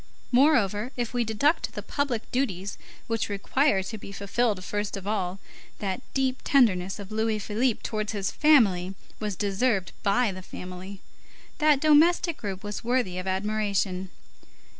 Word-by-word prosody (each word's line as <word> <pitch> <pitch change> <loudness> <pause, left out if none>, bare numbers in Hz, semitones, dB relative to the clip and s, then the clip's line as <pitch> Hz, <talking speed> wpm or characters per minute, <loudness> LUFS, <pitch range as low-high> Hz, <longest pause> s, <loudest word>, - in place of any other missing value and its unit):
Moreover, 245 -5 +3
if 240 -1 -2
we 245 -1 +1
deduct 235 +9 +1
the - - -5
public 265 -6 -2
duties 200 -7 -2 0.3
which 225 -1 -1
require 205 +1 +1
to 215 +3 -6
be 195 - -9
fulfilled 200 0 -1
first 205 +1 -3
of 195 - -8
all, 195 -3 -1 0.4
that 190 -2 -3
deep 265 -1 +1
tenderness 195 -9 +3
of 200 -1 -9
Louis 220 0 0
Philippe 215 +3 0
towards 215 -1 -2
his 200 -2 -1
family 195 -12 +4 0.2
was 210 -2 -3
deserved 200 0 0
by 205 +3 +2
the 185 0 -8
family. 185 +1 -8 0.6
That 300 -2 +4
domestic 315 +3 +4
group 195 -3 -5
was 205 0 -5
worthy 235 -7 0
of 185 - -6
admiration. 195 -1 -1
210 Hz, 145 wpm, -27 LUFS, 195-245 Hz, 0.6 s, family